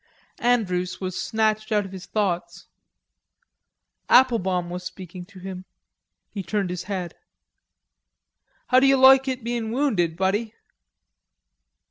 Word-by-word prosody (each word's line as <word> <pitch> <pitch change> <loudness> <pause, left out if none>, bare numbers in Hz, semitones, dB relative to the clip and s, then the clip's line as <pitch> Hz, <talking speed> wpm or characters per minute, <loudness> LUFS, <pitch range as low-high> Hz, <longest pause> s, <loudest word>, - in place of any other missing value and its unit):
Andrews 185 -7 0
was 185 -1 -4
snatched 215 0 0
out 210 -2 +2
of 190 - -10
his 190 -1 -9
thoughts. 175 -5 -2 1.4
Applebaum 190 -9 +3
was 180 +1 -5
speaking 180 -1 -9
to 195 +1 -17
him; 185 0 -7 0.7
he 200 - -5
turned 190 +1 -2
his 180 - -5
head. 185 -4 -4 1.6
"How 255 - +6
d'you 270 0 +4
loike 265 +1 +7
it 255 -2 -3
bein' 235 -1 -3
wounded, 210 - 0
buddy?" 205 +4 -1
200 Hz, 115 wpm, -24 LUFS, 180-235 Hz, 1.6 s, loike